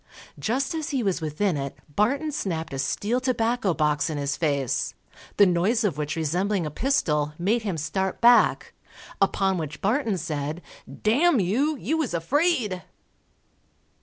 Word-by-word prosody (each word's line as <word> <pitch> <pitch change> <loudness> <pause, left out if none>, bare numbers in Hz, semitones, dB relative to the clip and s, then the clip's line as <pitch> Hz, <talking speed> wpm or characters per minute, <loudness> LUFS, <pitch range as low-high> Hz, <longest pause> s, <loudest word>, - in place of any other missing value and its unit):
Just 265 +6 -1
as 315 -2 -3
he 270 -4 -1
was 190 -4 0
within 160 +4 0
it, 140 -1 -4 0.2
Barton 280 +9 +1
snapped 165 - -3
a 135 - -4
steel 210 - 0
tobacco 235 -4 +1
box 150 0 +1
in 155 - -3
his 140 -1 -1
face, 140 -5 -1 0.4
the 205 - +7
noise 190 +6 +2
of 200 -8 +1
which 150 +1 -3
resembling 175 +4 0
a 150 - -4
pistol, 150 - 0
made 210 +7 +1
him 195 -6 -3
start 190 +5 -2
back, 240 0 +4 0.5
upon 195 -1 +2
which 155 -2 -5
Barton 220 0 0
said, 155 0 -4 0.3
_D 225 +7 0
n 345 -8 +5
you, 250 - +1
you 320 +4 -1
was 255 - -1
afraid. 230 - +1
195 Hz, 155 wpm, -25 LUFS, 155-240 Hz, 0.5 s, the